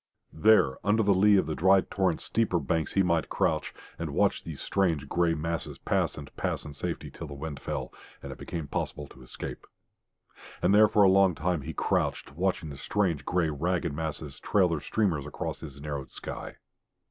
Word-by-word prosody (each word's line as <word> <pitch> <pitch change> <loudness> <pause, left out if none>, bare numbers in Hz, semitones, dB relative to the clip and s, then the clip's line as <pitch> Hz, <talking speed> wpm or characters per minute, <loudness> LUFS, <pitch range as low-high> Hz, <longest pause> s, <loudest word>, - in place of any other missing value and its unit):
There 80 -7 +4
under 105 +2 +3
the 100 -1 +4
lee 100 +2 +5
of 95 - +2
the 80 - -2
dry 95 +4 +5
torrent's 95 -4 -1
steeper 110 -6 +1
banks 80 -1 -1
he 95 - +4
might 85 -3 +1
crouch, 80 -1 0 0.3
and - - -4
watch - - +2
these 80 -4 -7
strange, 85 -7 0
grey 85 +1 +2
masses 80 +1 -3
pass - - 0
and 70 -2 -10
pass - - -2
in 75 - -7
safety 70 - -4
till 80 - -8
the 70 - -8
wind 75 0 -6
fell, - - -4 0.3
and - - -6
it - - -9
became 80 -4 -5
possible 75 0 -3
to 65 - -15
escape. 65 - -8 0.9
And 90 +3 +3
there 105 +1 +7
for 105 0 +4
a - - +7
long 95 -2 +5
time 85 0 -1
he 80 +4 -6
crouched, - - -1
watching 90 -1 -1
the 70 - -8
strange, 85 -5 0
grey, 90 -3 +1
ragged 85 +2 -1
masses 75 -2 -5
trail 95 -4 +3
their 80 -2 -1
streamers 80 -2 0
across - - -4
his 70 -3 -9
narrowed 70 -2 -5
sky. - - -7
80 Hz, 195 wpm, -28 LUFS, 75-95 Hz, 0.9 s, there